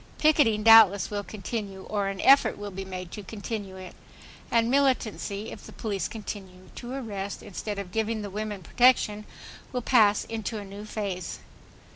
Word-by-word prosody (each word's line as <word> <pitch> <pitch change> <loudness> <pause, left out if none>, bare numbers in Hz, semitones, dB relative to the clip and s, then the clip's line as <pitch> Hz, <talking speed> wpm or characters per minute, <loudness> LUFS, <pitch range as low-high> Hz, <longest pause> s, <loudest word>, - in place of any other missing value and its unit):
Picketing 285 -9 +3
doubtless 215 -4 +7
will 205 -1 -2
continue, 200 -1 -6
or 205 -2 -2
an 195 -1 -4
effort 275 +1 +5
will 205 0 -6
be 195 +1 -6
made 185 -2 -7
to 210 - -7
continue 205 -1 -6
it; 185 -1 -9 0.6
and 230 -1 +3
militancy, 235 -6 0
if 205 - -10
the - - -11
police 205 -4 -3
continue 190 -4 -8
to 245 +1 -7
arrest, 205 -6 -5
instead 205 +1 -5
of 195 -3 -6
giving 220 +1 -1
the 200 - -6
women 210 -1 -5
protection, 215 -1 +3 0.5
will 250 -2 -3
pass 215 -5 +4
into 225 0 -4
a 205 - -6
new 200 +2 -9
phase. 195 -5 -4
210 Hz, 165 wpm, -27 LUFS, 195-225 Hz, 0.6 s, doubtless